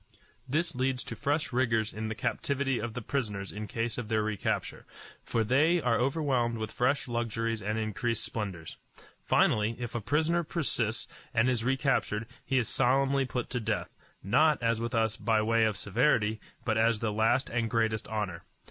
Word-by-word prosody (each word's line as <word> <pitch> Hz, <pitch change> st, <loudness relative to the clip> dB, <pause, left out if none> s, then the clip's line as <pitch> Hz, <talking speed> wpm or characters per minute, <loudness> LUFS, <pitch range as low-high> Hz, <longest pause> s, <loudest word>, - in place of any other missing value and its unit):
This 155 Hz, +6 st, 0 dB
leads 130 Hz, 0 st, -1 dB
to -, -, -7 dB
fresh 145 Hz, -1 st, -1 dB
rigors 115 Hz, -4 st, +1 dB
in 110 Hz, +1 st, -4 dB
the 110 Hz, -, -3 dB
captivity 135 Hz, +3 st, -1 dB
of 115 Hz, +1 st, -4 dB
the 125 Hz, -, -4 dB
prisoners 105 Hz, -7 st, -2 dB
in 105 Hz, +1 st, -6 dB
case 115 Hz, +3 st, -2 dB
of 120 Hz, -, -5 dB
their 110 Hz, -1 st, +1 dB
recapture, 105 Hz, -2 st, -2 dB, 0.4 s
for 115 Hz, -, 0 dB
they 150 Hz, +10 st, +3 dB
are 120 Hz, -7 st, +1 dB
overwhelmed 130 Hz, -3 st, +1 dB
with 110 Hz, 0 st, -4 dB
fresh 130 Hz, +3 st, +1 dB
luxuries 115 Hz, -1 st, -2 dB
and 105 Hz, +2 st, -2 dB
increased 110 Hz, +1 st, -1 dB
splendors. 95 Hz, -7 st, -5 dB, 0.5 s
Finally, 110 Hz, +2 st, +3 dB
if 120 Hz, -1 st, -5 dB
a 120 Hz, -, -2 dB
prisoner 160 Hz, +8 st, +1 dB
persist 125 Hz, -9 st, -1 dB, 0.3 s
and 115 Hz, +2 st, +4 dB
is 125 Hz, -3 st, +1 dB
recaptured, 130 Hz, -4 st, +1 dB, 0.2 s
he 135 Hz, -, 0 dB
is 120 Hz, -4 st, +2 dB
solemnly 135 Hz, +1 st, +2 dB
put 125 Hz, 0 st, -3 dB
to 125 Hz, -, -1 dB
death, 110 Hz, -1 st, -3 dB, 0.3 s
not, 150 Hz, +9 st, +4 dB
as 115 Hz, -1 st, +1 dB
with 120 Hz, +2 st, -2 dB
us, 110 Hz, -1 st, +2 dB
by 115 Hz, -2 st, +2 dB
way 115 Hz, +1 st, +3 dB
of 110 Hz, -2 st, 0 dB
severity, 110 Hz, -1 st, +1 dB, 0.2 s
but 110 Hz, -1 st, +1 dB
as 115 Hz, 0 st, +3 dB
the 110 Hz, -1 st, -2 dB
last 115 Hz, +5 st, +2 dB
and 115 Hz, -1 st, 0 dB
greatest 110 Hz, -2 st, 0 dB
honor. 100 Hz, -6 st, -3 dB
115 Hz, 175 wpm, -30 LUFS, 110-130 Hz, 0.5 s, and